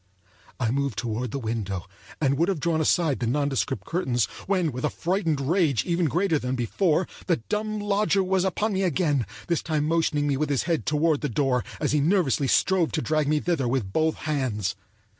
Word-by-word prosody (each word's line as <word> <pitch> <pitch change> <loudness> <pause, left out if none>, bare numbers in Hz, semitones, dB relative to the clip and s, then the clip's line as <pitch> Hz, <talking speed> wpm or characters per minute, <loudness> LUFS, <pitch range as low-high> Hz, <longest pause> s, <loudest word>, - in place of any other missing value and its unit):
I 115 -3 +1
moved 140 -3 -1
toward 120 +1 -2
the 125 - -4
window 110 -7 -3 0.3
and 140 -2 +2
would 170 +3 +3
have 190 -5 -1
drawn 160 +1 +1
aside 155 -2 +2
the 120 - -1
nondescript 135 -6 -1
curtains, 130 - 0 0.2
when 185 -5 +1
with 125 0 -6
a - - +2
frightened 170 -4 -1
rage 150 - +1
even 170 -1 +1
greater 170 0 +1
than 125 0 -2
before, 160 - +1 0.2
the 175 - +4
dumb 215 - -3
lodger 205 -1 +1
was 190 0 +1
upon 205 +3 0
me 190 - 0
again; 160 - +1 0.2
this 170 -2 +1
time 155 -2 -1
motioning 145 -3 +1
with 155 -1 0
his 140 -3 +1
head 165 -2 -1
toward 155 0 +2
the 150 - -1
door 125 0 +1 0.2
as - - 0
he 150 - +2
nervously 150 -4 +2
strove 180 +5 +2
to 155 - 0
drag 155 -2 +1
me 150 +1 +2
thither 155 -6 0
with 120 -6 -1
both 160 0 +2
hands. 120 -11 -2
150 Hz, 195 wpm, -25 LUFS, 130-175 Hz, 0.3 s, the